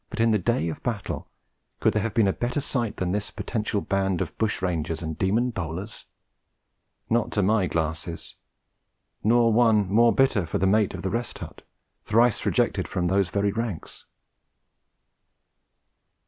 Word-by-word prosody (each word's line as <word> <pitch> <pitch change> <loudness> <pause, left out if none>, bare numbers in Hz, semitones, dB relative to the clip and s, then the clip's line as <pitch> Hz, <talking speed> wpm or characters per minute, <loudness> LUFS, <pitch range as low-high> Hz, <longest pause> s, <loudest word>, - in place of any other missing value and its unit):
But, - - -7
in 115 0 +4
the 105 - +3
day 105 -2 0
of 80 - -5
battle, 115 -5 -4 0.5
could - - +2
there 105 - +1
have 115 +1 -3
been 110 -4 +4
a 95 - +2
better 125 +3 -2
sight 125 -6 -2
than 90 -1 -1
this 105 +1 -1
potential 105 -3 -2
band 95 -2 0
of - - -4
bush 110 -2 0
rangers 85 -2 -2
and 80 -1 -4
demon 115 +9 +1
bowlers? 95 +2 -6 1.0
Not 115 0 +1
to 105 - +2
my 100 -1 +2
glasses; 80 +1 -3 0.9
nor 115 +1 +4
one 110 -4 +4
more 115 +2 +6
bitter 120 -10 +2
for - - -1
the 95 - +1
mate 105 +1 +2
of - - -7
the 95 - -1
Rest 120 +2 -3
Hut, - - -9 0.4
thrice 115 +1 +2
rejected - - +1
from 90 -1 -1
those 95 -1 +2
very 100 +2 0
ranks. 110 -5 -5
105 Hz, 160 wpm, -25 LUFS, 90-115 Hz, 1.0 s, more